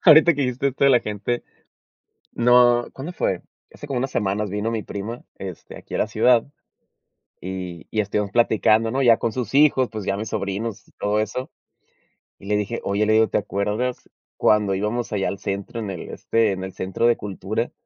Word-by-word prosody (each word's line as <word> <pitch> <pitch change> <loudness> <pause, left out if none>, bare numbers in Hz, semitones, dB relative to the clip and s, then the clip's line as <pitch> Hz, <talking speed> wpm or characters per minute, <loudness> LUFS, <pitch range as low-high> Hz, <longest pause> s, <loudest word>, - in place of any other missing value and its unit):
Ahorita 160 0 +8
que 145 - -1
dijiste 130 +1 0
esto 135 +1 -1
de 140 - +6
la 125 -2 +5
gente 105 +3 -3 0.9
no, 120 0 +5
¿cuándo 150 +7 -7
fue? 95 - -1 0.3
Hace 145 - -10
como 135 -3 -2
unas 135 +1 -2
semanas 105 0 -1
vino 105 +3 -1
mi 110 -2 -2
prima, 110 +4 -6
este, 95 -3 -8
aquí - - -10
a - - 0
la - - +2
ciudad, 120 -2 +3 1.0
y 90 -2 -6
y 110 - +1
estuvimos 100 0 -2
platicando, 115 -1 +3
¿no?, 135 +3 0
ya 120 -3 +6
con 115 - -1
sus 125 -2 -4
hijos, 135 -3 +5
pues, 110 -2 -6
ya 100 - 0
mis 110 +2 -4
sobrinos, 105 +2 -3
y - - -24
todo 105 +1 +1
eso. 110 +5 -3 0.9
Y - - -14
le 105 0 +2
dije: 105 +3 -2
"Oye", 100 +2 +1
le 110 - +3
digo: 110 0 +5
"¿Te - - +1
acuerdas 105 +5 -2 0.3
cuando 105 -2 +3
íbamos 105 +5 -2
allá 100 -2 0
al 100 - -5
centro 100 +4 -4
en 105 -3 -4
el 90 - -6
este, 115 -2 +1
en 95 -1 -4
el 95 - -8
centro 95 +5 0
de 120 - +4
cultura?". 105 +3 -3
110 Hz, 200 wpm, -23 LUFS, 100-120 Hz, 1.0 s, Ahorita